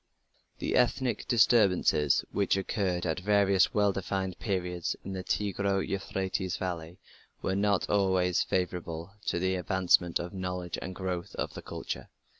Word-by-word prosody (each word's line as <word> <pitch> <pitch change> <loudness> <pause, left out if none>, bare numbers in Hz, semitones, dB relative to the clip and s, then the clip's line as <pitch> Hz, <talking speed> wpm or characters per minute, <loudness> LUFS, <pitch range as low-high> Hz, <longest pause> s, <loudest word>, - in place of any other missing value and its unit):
The - - -1
ethnic 125 0 +1
disturbances 100 - +4
which 100 -1 +1
occurred 95 -2 -1
at 80 +1 -1
various 100 -1 +3
well 100 -1 +2
defined 95 -1 -3
periods 90 -4 -2
in 95 - -5
the 95 -1 -4
Tigro 100 0 0
Euphrates 95 -1 -2
valley 85 -2 -4 0.5
were 95 - 0
not 100 -1 +2
always 95 -3 +2
favourable 90 -1 -2 0.2
to - - +1
the 95 +2 +1
advancement 90 -1 +2
of 85 +2 -6
knowledge 90 -2 -4
and 95 +1 -6
the - - -12
growth 90 -2 -3
of - - -3
culture. - - -6
95 Hz, 140 wpm, -29 LUFS, 90-100 Hz, 0.5 s, disturbances